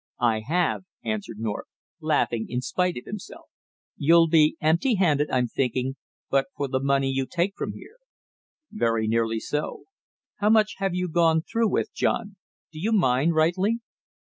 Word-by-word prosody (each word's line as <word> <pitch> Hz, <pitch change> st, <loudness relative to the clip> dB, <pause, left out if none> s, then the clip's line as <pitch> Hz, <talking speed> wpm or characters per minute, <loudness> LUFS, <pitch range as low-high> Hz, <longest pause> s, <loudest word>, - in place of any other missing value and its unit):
"I 115 Hz, -2 st, +2 dB
have," 165 Hz, +9 st, 0 dB, 0.2 s
answered 205 Hz, -, -3 dB
North, 110 Hz, -1 st, -4 dB, 0.3 s
laughing 145 Hz, -8 st, 0 dB
in 125 Hz, +1 st, -2 dB
spite 180 Hz, +6 st, -1 dB
of 125 Hz, -, -8 dB
himself. 210 Hz, -2 st, -9 dB, 0.5 s
"You'll 165 Hz, +3 st, +5 dB
be 155 Hz, -1 st, +4 dB
empty 170 Hz, -, +2 dB
handed 150 Hz, -6 st, +2 dB
I'm 125 Hz, -1 st, +2 dB
thinking, 130 Hz, +2 st, -1 dB, 0.4 s
but 135 Hz, 0 st, +2 dB
for 140 Hz, -, -1 dB
the 130 Hz, 0 st, -1 dB
money 135 Hz, 0 st, +1 dB
you 135 Hz, 0 st, -1 dB
take 180 Hz, +3 st, 0 dB
from -, -, -4 dB
here."' 470 Hz, -, -13 dB, 0.7 s
"Very 115 Hz, -, 0 dB
nearly 115 Hz, 0 st, +1 dB
so." 150 Hz, +6 st, -4 dB, 0.5 s
"How 210 Hz, 0 st, +2 dB
much 215 Hz, -1 st, +3 dB
have 195 Hz, -2 st, -1 dB
you 180 Hz, 0 st, -1 dB
gone 165 Hz, -1 st, +3 dB
through 230 Hz, +1 st, 0 dB
with, -, -, -1 dB
John, 205 Hz, -4 st, -1 dB, 0.4 s
do 155 Hz, -, -9 dB
you 210 Hz, +7 st, -1 dB
mind 160 Hz, -, +3 dB
rightly?" 185 Hz, +8 st, +2 dB
155 Hz, 160 wpm, -25 LUFS, 130-185 Hz, 0.7 s, You'll